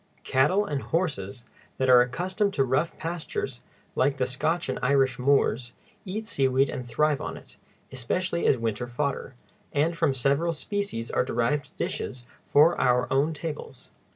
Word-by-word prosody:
Cattle 165 +11 +2
and 145 -7 -2
horses 125 - -2 0.3
that 130 - +1
are 125 -1 +8
accustomed 185 - -1
to 135 - +3
rough 135 +6 0
pastures, 160 -6 -4 0.3
like 140 +1 +2
the 130 - +1
Scotch 155 +7 -1
and 130 - -2
Irish 135 0 +2
moors, 125 -2 +2 0.3
eat 210 +3 -4
seaweed 135 - +2
and 125 -1 -5
thrive 150 +4 +1
on - - -5
it, - - -15 0.4
especially 170 +8 -1
as 130 - +4
winter 115 +1 -2
fodder, 135 +1 -3 0.4
and 155 +4 +1
from 160 -5 +1
several 140 +6 +1
species 165 - -3
are - - +2
derived 130 +5 -1
dishes 125 -1 -4 0.2
for 155 +4 +5
our 125 0 +3
own 140 +4 +2
tables. 150 -4 -7
140 Hz, 155 wpm, -26 LUFS, 125-165 Hz, 0.4 s, are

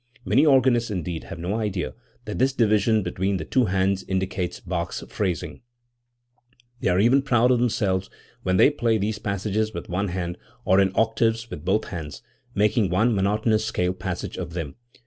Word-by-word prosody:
Many 125 +11 +4
organists, 130 -4 +4
indeed, 90 -4 -4
have - - -8
no 90 +4 -3
idea 100 -5 -2 0.3
that 105 - -5
this 130 +1 +3
division 110 -2 +3
between 95 +2 -1
the - - -5
two 130 -2 +2
hands 95 0 +1
indicates 95 -1 -2
Bach's 85 -2 -4
phrasing; 90 -6 -3 1.2
they - - 0
are 90 +1 +2
even 120 +6 +5
proud 125 -2 +3
of 125 - +3
themselves 95 -6 0 0.3
when 95 0 +1
they 140 - +6
play 115 -6 +1
these 105 +1 -2
passages 105 +1 -2
with - - -6
one 95 +3 -1
hand, 90 -1 -4 0.3
or 95 +1 +4
in 95 -1 +3
octaves 115 +1 +1
with 75 - -7
both 95 +5 +1
hands, 80 -7 -7 0.3
making 105 0 +2
one 110 +7 +2
monotonous 110 +2 +1
scale 90 -4 0
passage 95 -2 -5
of 85 - -5
them. 80 -5 -5
100 Hz, 170 wpm, -24 LUFS, 95-115 Hz, 1.2 s, they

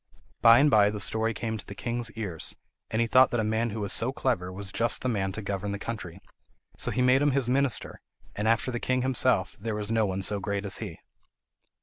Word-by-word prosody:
By 115 0 +8
and 145 +3 +4
by 105 -2 +5
the 105 0 -5
story 110 +2 0
came 110 0 -4
to 95 - -10
the 100 - -8
king's 120 +2 -3
ears, 95 -8 -5 0.3
and 110 - -1
he 115 - +1
thought 130 +2 +5
that 120 - -1
a - - +1
man 110 +2 0
who 110 0 -5
was 100 -1 +1
so 120 +3 +2
clever 120 -10 -1
was 100 +1 -4
just 115 +2 0
the - - 0
man 95 -4 -1
to 110 - -5
govern 100 0 -3
the - - -3
country; 100 -5 -6 0.6
so - - -2
he 125 - 0
made 130 +2 +4
him 145 -2 +2
his 135 -3 0
minister, 130 -1 +1 0.3
and 105 +1 -2
after 115 +3 +1
the 120 - -3
king 130 +1 0
himself 125 -6 +1
there 110 +1 -3
was 105 0 -4
no 110 -2 +2
one 95 0 -2
so 105 +2 +1
great 100 0 -3
as 100 - -3
he. - - -6
110 Hz, 240 wpm, -27 LUFS, 100-120 Hz, 0.6 s, By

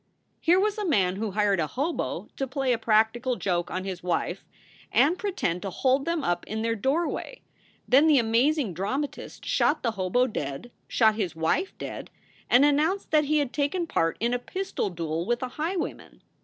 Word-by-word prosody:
Here 350 +3 +4
was 420 +2 0
a 415 - -1
man 190 -8 +2
who 220 +1 -2
hired 200 -1 +1
a 155 - +1
hobo 290 - -3
to 270 - -2
play 265 -1 0
a 230 - -1
practical 230 +3 +2
joke 175 -5 -1
on 185 +1 -3
his 185 -2 -5
wife 175 -2 -2 0.5
and 310 +6 +4
pretend 370 - -2
to 195 - -3
hold 265 +7 +1
them 335 -3 -1
up 175 -5 0
in 220 +1 -3
their 230 0 +1
door 270 - 0
way; - - -6 0.4
then 280 +5 +6
the 300 -3 +6
amazing 240 - +2
dramatist 260 - -4
shot - - +1
the 230 - +1
hobo 205 +4 +1
dead, 150 - -5 0.2
shot 220 -2 +4
his 200 -7 -3
wife 160 - 0
dead, - - -7 0.4
and 255 +4 +6
announced 310 +7 +1
that 305 -1 +4
he 305 +2 +2
had 285 -4 0
taken 300 +5 0
part 165 - 0
in 235 +2 0
a 245 - 0
pistol 375 - -3
duel 165 -2 -3
with 240 +6 -1
a 255 - -3
highwayman. 325 +6 -4
245 Hz, 190 wpm, -26 LUFS, 195-300 Hz, 0.5 s, then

